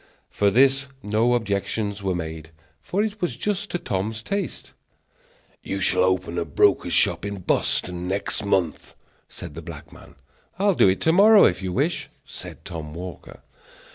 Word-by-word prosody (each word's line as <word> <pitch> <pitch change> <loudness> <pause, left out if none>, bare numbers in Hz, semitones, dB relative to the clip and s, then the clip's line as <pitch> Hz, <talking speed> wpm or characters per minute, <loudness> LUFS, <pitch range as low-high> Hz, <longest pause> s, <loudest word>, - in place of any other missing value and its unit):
To 100 - +5
this 135 +4 +4 0.2
no 110 +4 +2
objections 100 -1 -2
were 95 -2 -1
made, 80 -2 -6 0.3
for 200 +3 -1
it 215 -1 -4
was 170 -9 -1
just 205 - -2
to - - -1
Tom's 110 - -3
taste. 200 - -4 0.9
"You 95 - -4
shall 90 -1 +3
open 95 -2 0
a - - 0
broker's - - +2
shop - - +2
in 100 -1 -5
Boston 90 0 0
next 100 +3 0
month," 95 -6 -1 0.3
said - - -9
the 80 - -8
black 80 -2 -10
man. - - -15 0.4
"I'll 200 +1 +3
do 100 - +5
it 95 - 0
to 160 - +3
morrow, 205 +3 +7
if 90 - +1
you 95 -1 -3
wish," 145 - -1 0.2
said - - -10
Tom 80 -2 -7
Walker. 90 +1 -9
100 Hz, 165 wpm, -24 LUFS, 90-135 Hz, 0.9 s, morrow